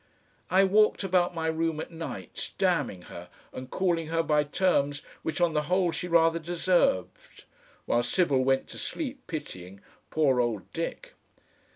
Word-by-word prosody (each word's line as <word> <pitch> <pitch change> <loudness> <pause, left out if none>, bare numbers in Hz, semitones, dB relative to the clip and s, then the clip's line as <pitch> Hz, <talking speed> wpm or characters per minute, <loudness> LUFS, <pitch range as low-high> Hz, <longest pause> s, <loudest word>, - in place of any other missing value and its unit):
I 190 +2 +5
walked 210 +2 +3
about 180 -2 +1
my 160 -1 -2
room 160 -1 0
at - - -6
nights, 160 - -6
damning 90 -2 0
her 85 0 -10 0.2
and 130 0 -7
calling 170 -2 0
her 165 +1 0
by 150 -2 +2
terms 145 -3 +1 0.2
which 160 - -3
on 175 -2 +2
the 150 - +2
whole 180 -1 +2
she 170 +2 -4
rather 165 -1 +3
deserved, 170 - 0 0.4
while 120 - +2
Sybil 135 +1 +2
went 135 0 +1
to - - -7
sleep 280 -3 -4
pitying 95 - -7 0.3
"poor 140 -5 +2
old 115 -5 -3
Dick!" - - -5
160 Hz, 155 wpm, -28 LUFS, 135-175 Hz, 0.4 s, I